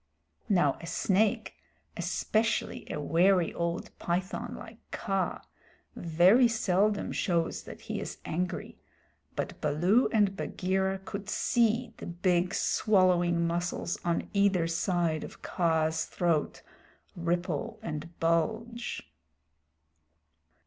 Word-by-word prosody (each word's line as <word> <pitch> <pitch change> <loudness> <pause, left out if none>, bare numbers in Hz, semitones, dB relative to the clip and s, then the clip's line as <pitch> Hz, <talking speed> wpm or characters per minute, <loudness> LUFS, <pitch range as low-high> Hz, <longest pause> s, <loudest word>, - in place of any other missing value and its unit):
Now 175 -9 +3
a 170 - -8
snake, 200 +4 +1 0.4
especially 225 +1 -1
a - - -3
wary 175 +4 +3
old 170 0 -3
python 180 +3 -2
like - - -11
Kaa, 195 -4 -2 0.5
very 180 +9 +5
seldom 210 -2 +1
shows 170 -3 0
that - - -10
he - - -4
is - - -6
angry, 180 +2 -3 0.6
but - - -4
Baloo 180 - +3
and 205 -4 +3
Bagheera 190 0 -1
could 200 +1 -6
see 235 +1 +1
the - - -8
big 175 +1 +1
swallowing 175 -4 +3
muscles 170 0 -2
on 170 -1 0
either 200 -4 +3
side 165 -1 0
of - - -10
Kaa's 160 -2 +1
throat 170 -4 -1 0.5
ripple 175 +4 -2
and 165 -1 -6
bulge. 220 +9 -1
180 Hz, 105 wpm, -29 LUFS, 170-200 Hz, 0.6 s, very